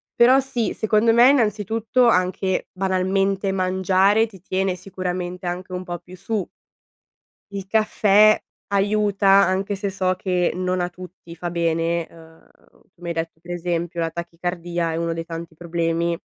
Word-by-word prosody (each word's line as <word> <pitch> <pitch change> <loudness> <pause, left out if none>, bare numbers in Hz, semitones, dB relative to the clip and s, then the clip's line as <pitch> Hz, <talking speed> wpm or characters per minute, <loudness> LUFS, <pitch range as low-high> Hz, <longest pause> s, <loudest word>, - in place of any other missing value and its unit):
Però 250 +3 +6
sì, 260 -4 -2
secondo 220 +1 +2
me 240 +2 +7
innanzitutto 225 0 +2
anche 185 -1 +1
banalmente, 195 +1 0
mangiare 190 +3 +2
ti 195 -5 -16
tiene 190 0 -1
sicuramente 180 0 -5
anche 180 +1 -4
un 180 0 -4
po' 175 -1 -5
più 185 +1 -14
su. 210 0 -3 1.0
Il 195 -1 -6
caffè 215 0 +4 0.4
aiuta 200 0 +1
anche 195 +1 +4
se 200 +1 -3
so 185 -1 0
che 180 -2 0
non 185 0 -1
a 175 - 0
tutti 175 -1 -12
fa 175 +2 -4
bene, 170 0 0
ehm, 160 -1 -18 0.4
tu - - -31
mi 170 - -6
hai 170 - -2
detto 165 0 -4
per 175 +1 -8
esempio 170 -1 -2
la 165 -1 -1
tachicardia 170 0 -3
è 160 - -3
uno 165 0 -1
dei 165 0 -4
tanti 165 0 -7
problemi. 170 0 -1
185 Hz, 155 wpm, -22 LUFS, 170-200 Hz, 1.0 s, me